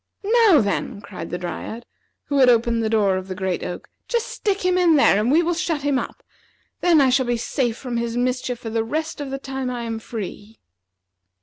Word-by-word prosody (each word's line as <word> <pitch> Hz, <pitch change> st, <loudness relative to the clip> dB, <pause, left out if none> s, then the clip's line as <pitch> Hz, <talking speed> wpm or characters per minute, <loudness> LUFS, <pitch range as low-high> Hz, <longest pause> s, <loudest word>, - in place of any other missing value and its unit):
"Now, 330 Hz, -, +6 dB
then," 200 Hz, 0 st, -2 dB
cried 190 Hz, -4 st, -8 dB
the 175 Hz, -, -3 dB
Dryad, 215 Hz, +6 st, -6 dB, 0.4 s
who 285 Hz, -1 st, -1 dB
had 255 Hz, -2 st, +7 dB
opened 235 Hz, -1 st, +3 dB
the 220 Hz, -, 0 dB
door 205 Hz, -4 st, +2 dB
of 185 Hz, 0 st, -6 dB
the 185 Hz, -, -5 dB
great 190 Hz, -1 st, -2 dB
oak, 180 Hz, -, -6 dB, 0.2 s
"just 470 Hz, -1 st, -1 dB
stick 400 Hz, -3 st, -2 dB
him 365 Hz, 0 st, +3 dB
in 350 Hz, -3 st, +4 dB
there, 240 Hz, -8 st, +5 dB
and 225 Hz, +4 st, +1 dB
we 330 Hz, +4 st, +4 dB
will 345 Hz, +1 st, +1 dB
shut 330 Hz, -4 st, -2 dB
him 285 Hz, -2 st, +2 dB
up. -, -, -7 dB, 0.6 s
Then 345 Hz, -3 st, +4 dB
I 265 Hz, -2 st, +4 dB
shall 260 Hz, -1 st, +2 dB
be 240 Hz, -1 st, +1 dB
safe 240 Hz, 0 st, -1 dB
from 245 Hz, -3 st, -4 dB
his 235 Hz, 0 st, -2 dB
mischief 250 Hz, 0 st, -1 dB
for 225 Hz, -1 st, -7 dB
the 225 Hz, 0 st, 0 dB
rest 315 Hz, +5 st, -3 dB
of 285 Hz, -, -5 dB
the 270 Hz, -, -3 dB
time 270 Hz, -1 st, -4 dB
I 245 Hz, -1 st, -4 dB
am 225 Hz, -1 st, -4 dB
free." 220 Hz, -1 st, -7 dB
245 Hz, 220 wpm, -22 LUFS, 220-285 Hz, 0.6 s, had